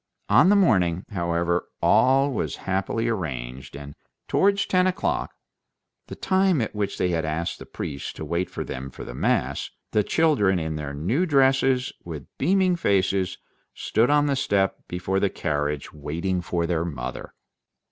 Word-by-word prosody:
On 180 - +6
the 205 - +6
morning, 95 - +3
however, 85 -1 0
all 135 +2 +4
was - - -2
happily 95 +4 -1
arranged, 65 - -4
and 70 0 -8 0.3
towards 200 +1 +2
ten 185 0 +2
o'clock—the 185 +1 -5
time 190 -4 +2
at 110 - -2
which 105 -2 -2
they 90 - +1
had 85 -2 0
asked 80 +2 -3
the - - -10
priest 70 -2 -6
to 80 - -6
wait 85 +4 -1
for - - -5
them 65 +1 -6
for - - -9
the - - -8
mass—the 70 +12 -1
children 135 - +3
in 80 -2 -3
their 75 -2 -5
new 115 - 0
dresses, 135 -3 +3
with 80 -5 -7
beaming 190 -1 +3
faces, 95 - +1 0.4
stood 115 +3 +1
on 145 0 +4
the 140 -1 +1
step 100 -7 +1
before 95 +2 -1
the 100 - +2
carriage 75 -4 -2
waiting 85 +5 -2
for 85 -1 -1
their 85 -1 0
mother. 65 -7 -6
95 Hz, 155 wpm, -24 LUFS, -, 0.4 s, On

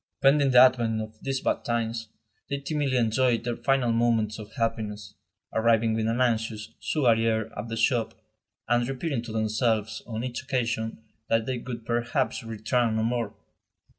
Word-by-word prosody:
Pending 140 0 +4
the 125 - +4
advent 120 -3 +5
of 110 0 -5
these 135 -1 -2
bad - - 0
times, 115 -1 -2 0.4
they 140 - -1
timidly 140 -2 -1
enjoyed 120 +1 +2
their 120 -1 -2
final 135 -3 +2
moments 115 -2 +1
of 105 0 -9
happiness, 105 -3 -3 0.4
arriving 115 0 +3
with 110 0 0
an 115 +2 0
anxious, 110 -3 0
sugary 115 -6 +2
air 110 0 -1
at 105 +3 -5
the 115 0 -4
shop, 115 0 +1 0.5
and 120 +1 +2
repeating 135 -1 -2
to 120 -1 -8
themselves, 110 0 0
on 115 -1 -4
each 125 -1 -4
occasion, 115 -4 -2 0.3
that 115 -1 +2
they 130 -1 -2
would 115 -2 -7
perhaps 120 +3 -1
return 115 +1 0
no 110 - +1
more. 115 -2 -1
115 Hz, 165 wpm, -27 LUFS, 110-125 Hz, 0.5 s, advent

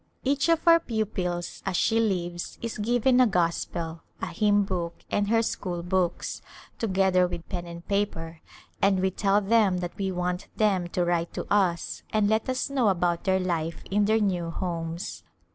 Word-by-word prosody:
Each 275 +4 +1
of 330 0 +2
our 335 0 +8
pupils 190 - -3
as 190 -3 -1
she 225 - +2
leaves 175 -5 -2
is 230 -2 -5
given 245 +3 +3
a 250 - +6
Gospel, 170 -3 -1 0.2
a - - -3
hymn 205 -2 +3
book 175 -3 -3 0.2
and 205 0 +1
her 225 +1 +3
school 175 -5 -3
books, 180 -1 -1 0.4
together 190 -3 +3
with 175 -1 -7
pen 175 0 -4
and 170 0 -9
paper, 165 -5 -2 0.4
and 195 -1 +4
we 190 0 +1
tell 200 +2 +2
them 205 -2 +3
that 175 -1 -4
we 195 -1 0
want 180 0 -2
them 195 -5 +2
to 175 0 -1
write 170 -1 -1
to - - -3
us 185 -4 +1
and 215 -1 +2
let 220 +4 +1
us 255 0 0
know 270 -5 +1
about 175 -2 0
their 190 -1 +3
life 170 -3 -2
in 205 +1 +3
their 220 +2 +3
new 180 -5 0
homes. 170 0 -4
190 Hz, 180 wpm, -27 LUFS, 175-215 Hz, 0.4 s, our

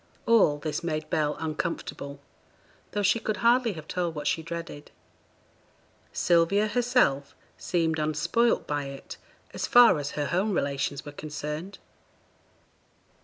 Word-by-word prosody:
All 205 -11 +4
this 150 +3 -4
made 155 -2 -2
Bell 150 -2 0
uncomfortable, 155 -3 -4 0.7
though 205 - -1
she 200 +4 +3
could 215 -1 -2
hardly 235 -1 +3
have 155 -2 -10
told 175 -3 -2
what 150 - -5
she 165 - +1
dreaded. 165 -2 -7 1.2
Sylvia 175 +5 +3
herself 235 - +1 0.2
seemed 165 -3 -1
unspoilt 155 +10 +1
by 145 -1 -2
it 135 0 -9 0.4
as - - -3
far 240 - +7
as 145 0 -4
her 145 - 0
home 190 +7 0
relations 140 -2 -2
were 145 - -7
concerned. 150 +5 -6
160 Hz, 125 wpm, -27 LUFS, 150-200 Hz, 1.2 s, far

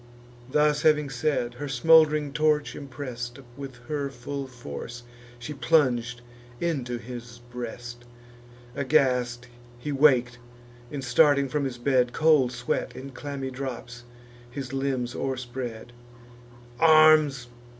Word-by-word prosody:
Thus 150 0 +3
having 150 -2 +3
said, 125 -2 -1
her 145 - -4
smould'ring 150 +1 +4
torch, 150 -1 +1
impress'd 125 -3 -7 0.2
With 135 -2 -8
her 145 -2 -2
full 135 +2 -6
force, 120 - -8 0.3
she 120 +5 -7
plung'd 125 -6 +1 0.4
into 135 -8 -2
his 120 0 -9
breast. 120 0 -7 0.7
Aghast 125 -4 +1 0.3
he 135 +5 -5
wak'd; 130 -4 +3 0.5
and, 140 -2 -5
starting 140 +2 +4
from 140 +2 -1
his 130 -2 -4
bed, 125 -1 +1
Cold 150 -5 +4
sweat, 120 -1 -3
in 135 +1 -8
clammy 135 0 -5
drops, 125 -2 -6 0.5
his 135 +1 -6
limbs 135 -3 -1
o'erspread. 125 -3 -5 0.9
"Arms! 155 -4 +6
130 Hz, 110 wpm, -26 LUFS, 120-145 Hz, 0.9 s, Arms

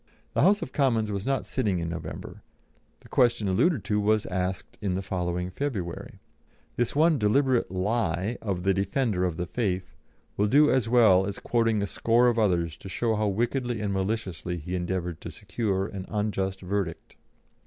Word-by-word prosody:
The - - +2
House 205 +2 +4
of - - -7
Commons 115 -7 +1
was 100 +2 -3
not 135 -1 0
sitting 105 -8 0
in 85 -1 -2
November; 85 -2 -7 0.6
the - - -16
question 120 -4 +2
alluded 120 - +2
to 105 +1 0
was 105 +1 +2
asked 95 0 -3
in 95 -3 -1
the 95 - -2
following 90 -1 -2
February. 95 -9 -4 0.6
This 120 +2 -1
one 155 0 +4
deliberate 125 +4 +2
lie 95 +1 -1
of 95 -5 -2
the 95 +1 +3
"defender 100 0 0
of 85 -3 -2
the 90 - -2
faith" 95 -1 -2 0.4
will 105 - +3
do 150 +6 +5
as 130 -4 +1
well 110 -6 +5
as 100 - -4
quoting 115 -3 +1
a - - +1
score 115 +4 +3
of 115 -1 0
others 85 -6 +1
to 95 - -10
show 115 +3 0
how 105 0 +1
wickedly 120 +3 -1
and 105 -2 -1
maliciously 95 -4 -2
he 85 +3 -6
endeavoured 90 -2 -2
to - - -6
secure 100 -1 -2
an 95 -2 -7
unjust 95 -2 -2
verdict. 95 -2 -3
100 Hz, 175 wpm, -27 LUFS, 90-115 Hz, 0.6 s, do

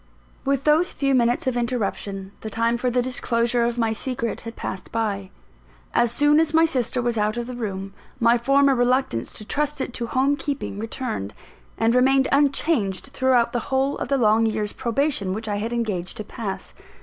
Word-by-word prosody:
With 275 -1 0
those 305 +4 +3
few 275 -1 +1
minutes 240 -1 +2
of 260 -2 0
interruption, 200 -5 -2
the 220 - -5
time 230 +1 +1
for 250 - +1
the 245 0 +1
disclosure 235 -1 0
of 235 0 -1
my 225 -2 +1
secret 235 0 -3
had 230 0 -8
passed 190 - -6
by. 205 -4 -2 0.6
As 240 - +3
soon 295 +5 +4
as 320 -1 +1
my 325 +1 +6
sister 255 -5 0
was 240 -2 0
out 210 +2 0
of 240 - -2
the 250 - -7
room, 195 -5 -5 0.3
my 235 +1 +5
former 275 +3 +4
reluctance 245 - +1
to 215 - -5
trust 295 +5 -1
it 255 - -3
to 235 -1 -3
home 270 +4 +1
keeping 275 -7 -4
returned, 220 - -4 0.4
and 225 +1 +2
remained 265 +2 +4
unchanged 275 - +1
throughout 250 -3 +2
the 240 - +1
whole 270 +1 +1
of - - -3
the 275 - +1
long 225 -1 +4
year's 215 -1 -1
probation 240 -6 0
which 220 +1 -5
I 205 -1 -1
had 220 +3 -3
engaged 210 -7 -2
to 215 - -4
pass. 210 -2 -6
240 Hz, 190 wpm, -23 LUFS, 220-270 Hz, 0.6 s, my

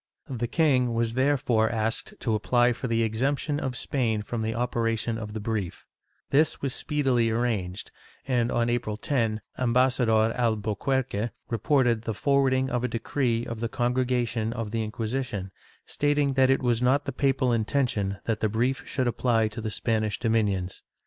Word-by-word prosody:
The 120 -2 -2
king 130 -6 +2
was 115 0 0
therefore 125 -4 +2
asked 110 0 -2
to 115 - 0
apply 120 +3 +3
for 125 - -5
the 115 -1 +1
exemption 140 +6 0
of 130 -3 -3
Spain 115 -6 -1
from 115 +2 -4
the 110 0 -2
operation 115 -1 -1
of 105 -1 -6
the 110 - -4
brief; 105 -4 -3 0.5
this 150 +2 +3
was 135 -3 -2
speedily 130 -6 +1
arranged 110 -5 -2 0.4
and, 120 -2 +1
on 120 0 +1
April 120 -3 -1
10, 110 -4 0 0.2
Ambassador 120 -3 +3
Alburquerque 115 +1 0 0.2
reported 120 -1 +2
the 110 -1 -4
forwarding 135 0 +2
of 125 -1 -1
a - - +2
decree 120 0 -1
of 115 -1 -5
the 115 0 -2
Congregation 120 -2 0
of 115 -4 -4
the 115 -1 -1
Inquisition, 110 -3 -3 0.3
stating 145 -1 +1
that 130 -1 +4
it 135 0 +2
was 120 -2 +1
not 135 +3 +2
the - - -2
papal 135 -1 +1
intention 110 -4 0
that 110 -2 -1
the 110 - +1
brief 120 +5 0
should 130 -2 -1
apply 115 -2 +1
to 105 +2 -7
the 110 - -3
Spanish 110 -2 -1
domin 115 -2 +2
ions. 95 -1 -4
120 Hz, 165 wpm, -26 LUFS, 110-130 Hz, 0.5 s, that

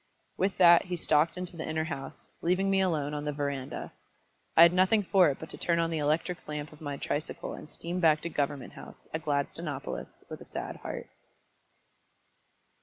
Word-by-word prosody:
With 195 +1 0
that 175 -1 +7
he 180 -1 -3
stalked 160 +1 +2
into 180 -1 -3
the 160 -1 -5
inner 160 0 0
house, 150 -4 -7
leaving 185 +3 +2
me 195 0 +3
alone 155 -6 0
on 145 0 -3
the 150 - -1
verandah. 140 -2 -4 0.7
I 165 - +11
had 170 +1 +7
nothing 190 +4 +4
for 185 -3 +5
it 140 - -2
but 160 - -7
to - - -8
turn 170 -1 +1
on 165 0 +1
the 160 - -1
electric 155 +4 -1
lamp 150 0 -5
of 155 - -16
my 145 -2 -4
tricycle 145 +2 -3
and - - -9
steam 175 +2 -4
back 155 -3 +4
to 170 - -3
Government 140 -4 -2
House - - -13
at 160 0 -3
Gladstonopolis 145 0 -3
with - - -8
a - - -10
sad - - -5
heart. - - -6
160 Hz, 190 wpm, -29 LUFS, 150-180 Hz, 0.7 s, I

